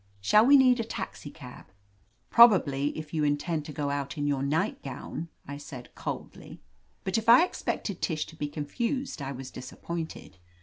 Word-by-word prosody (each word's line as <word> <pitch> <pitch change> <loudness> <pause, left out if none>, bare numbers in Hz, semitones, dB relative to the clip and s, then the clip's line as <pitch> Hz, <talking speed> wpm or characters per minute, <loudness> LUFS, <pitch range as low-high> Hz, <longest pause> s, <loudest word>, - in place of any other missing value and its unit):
"Shall 210 - +5
we 285 +1 +8
need 255 -2 +5
a - - +1
taxicab?*' 145 - -8 0.6
"Probably, 170 - +6
if 155 0 -7
you 155 -2 0
intend 150 +2 0
to 150 - -7
go 145 -1 -2
out 140 +1 -3
in 145 - -1
your 140 -2 0
nightgown," 145 +2 -3 0.2
I 140 +1 -6
said 130 -4 -10
coldly. - - -7 0.4
But 190 +3 0
if 225 +1 -2
I 250 +9 +9
expected 200 - -4
Tish 155 -2 -1
to 160 - -13
be 150 -2 -3
confused, 230 - -3
I 135 0 -4
was 130 -1 -7
disappointed. 160 - -7
150 Hz, 165 wpm, -28 LUFS, 140-200 Hz, 0.6 s, I